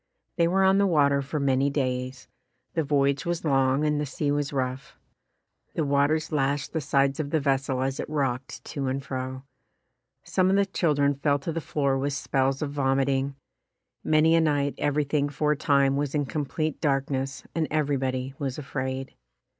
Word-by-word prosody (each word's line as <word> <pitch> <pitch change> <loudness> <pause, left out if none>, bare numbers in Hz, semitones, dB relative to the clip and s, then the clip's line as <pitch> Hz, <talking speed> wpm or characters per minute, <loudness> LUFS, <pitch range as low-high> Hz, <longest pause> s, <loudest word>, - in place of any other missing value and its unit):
They 170 -1 +4
were 190 +3 +2
on 190 +1 +4
the 200 - +4
water 140 -5 +3
for 140 +3 -3
many 135 0 +2
days. 130 -2 -2 0.5
The 165 - +1
voyage 140 -1 +1
was 170 -1 -2
long 135 0 +2
and 150 -1 +1
the - - -1
sea 145 +2 -1
was 145 -1 -1
rough. 130 -1 -3 0.8
The 160 - 0
waters 145 +3 +1
lashed 140 -1 0
the 160 - -1
sides 140 -1 +1
of 145 -2 -2
the 160 - +1
vessel 135 -2 0
as 135 +1 -2
it - - -4
rocked 135 -4 -2
to 140 -2 -3
and 135 +1 -2
fro. 130 0 -5 0.8
Some 185 +1 +1
of 195 - +3
the 200 0 +3
children 150 -7 +1
fell 140 +1 +1
to 145 +4 -4
the 165 +1 -3
floor 140 -3 0
with 140 +1 -1
spells 135 0 0
of 145 - -3
vom 135 -2 +1
iting. 135 0 0 0.7
Many 155 +1 +4
a 165 - +5
night 145 -3 +1
everything 145 0 +1
for 150 +1 0
a - - +2
time 140 -2 +2
was 145 0 -2
in 145 -1 +1
complete 155 +2 -3
darkness 135 -2 -1
and 160 -2 0
everybody 135 -3 -1
was 135 -3 -3
afraid. 130 -2 -4
140 Hz, 180 wpm, -26 LUFS, 135-150 Hz, 0.8 s, a